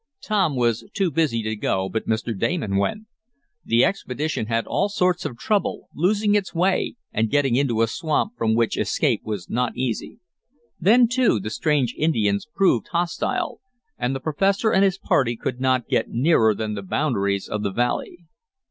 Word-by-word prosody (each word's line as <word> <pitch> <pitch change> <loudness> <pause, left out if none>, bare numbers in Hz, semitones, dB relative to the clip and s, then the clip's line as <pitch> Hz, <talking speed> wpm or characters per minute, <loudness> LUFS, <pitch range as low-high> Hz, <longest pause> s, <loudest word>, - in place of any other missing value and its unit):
Tom 195 -9 +1
was 120 -3 +1
too 195 -5 +1
busy 140 -7 0
to 110 0 -2
go, 95 -2 -1
but 110 +3 -4
Mr. 110 +1 -1
Damon 105 - -1
went. 155 - -1 0.6
The 115 +1 +3
expedition 150 - -2
had 115 -1 0
all 200 - 0
sorts 180 -2 0
of 120 - -4
trouble, 205 - -1
losing 205 +5 +1
its 200 -3 0
way 185 +6 +1 0.2
and 110 +1 +1
getting 140 -3 +2
into 120 -4 +2
a - - +2
swamp 160 - -1
from 110 - +1
which 115 -1 +1
escape - - +1
was 105 -5 -5
not 125 0 -1
easy. 125 -3 -3 0.6
Then, 230 +7 +5
too, 245 - +2
the 105 +3 -5
strange 140 -3 +1
Indians 110 -9 0
proved 195 -1 +2
hostile, 170 -2 -2 0.3
and 130 +2 -2
the - - -3
professor 195 - +1
and 190 - +4
his 195 -1 +2
party 120 -9 +1
could 125 - -4
not 130 -2 +1
get - - 0
nearer 115 -5 +3
than 110 +1 -3
the 100 - -4
boundaries 100 -3 -1
of 105 - -3
the 100 - -1
valley. 125 - -2
130 Hz, 175 wpm, -23 LUFS, 110-180 Hz, 0.6 s, Then